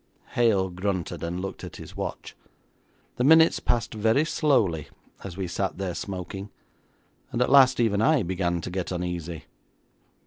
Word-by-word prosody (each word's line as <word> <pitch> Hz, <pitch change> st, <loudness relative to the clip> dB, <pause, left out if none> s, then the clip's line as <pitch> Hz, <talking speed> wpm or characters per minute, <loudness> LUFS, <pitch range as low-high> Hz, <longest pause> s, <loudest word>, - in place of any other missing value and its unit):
Hale 100 Hz, -6 st, +2 dB
grunted 90 Hz, -3 st, -3 dB
and 85 Hz, +2 st, -3 dB
looked 95 Hz, 0 st, -6 dB
at -, -, -8 dB
his -, -, -11 dB
watch. -, -, -5 dB, 0.8 s
The 125 Hz, -, +1 dB
minutes 160 Hz, +4 st, +6 dB
passed 120 Hz, -1 st, -1 dB
very 110 Hz, +7 st, +2 dB
slowly 110 Hz, -, +1 dB, 0.4 s
as 95 Hz, -2 st, -8 dB
we 95 Hz, -, -2 dB
sat 95 Hz, +2 st, -2 dB
there 95 Hz, -2 st, -3 dB
smoking, 95 Hz, +2 st, -6 dB, 0.8 s
and -, -, -2 dB
at 125 Hz, -, +2 dB
last 130 Hz, -2 st, +6 dB
even 110 Hz, -3 st, +2 dB
I 145 Hz, 0 st, +3 dB
began 85 Hz, -1 st, -1 dB
to 90 Hz, -, -6 dB
get 95 Hz, 0 st, -3 dB
uneasy. 85 Hz, -2 st, -4 dB
95 Hz, 150 wpm, -26 LUFS, 90-120 Hz, 0.8 s, minutes